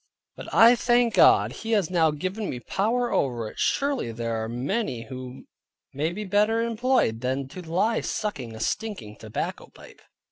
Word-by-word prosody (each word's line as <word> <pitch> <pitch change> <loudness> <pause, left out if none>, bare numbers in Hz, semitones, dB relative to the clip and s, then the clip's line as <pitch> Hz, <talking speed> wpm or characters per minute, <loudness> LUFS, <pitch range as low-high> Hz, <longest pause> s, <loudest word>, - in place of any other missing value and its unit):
But - - -9
I 235 +2 +7
thank 240 -1 +2
God, - - +5
He 225 0 -4
has 195 -6 +1
now 165 -3 +3
given 185 +8 -3
me 125 - -4
power 230 - -1
over 120 -5 0
it; - - -14
surely 275 - 0
there 115 0 -3
are 110 - -4
many 130 - -2
who 130 0 -9 0.5
may 150 +4 -1
be 210 +4 -5
better 210 +3 +2
employed 235 - +1
than 130 +1 -2
to 185 - -8
lie 185 +7 0
sucking 130 - -4
a - - -9
stinking 110 - -3
tobacco 110 -1 -5
pipe. - - -16
180 Hz, 170 wpm, -25 LUFS, -, 0.5 s, I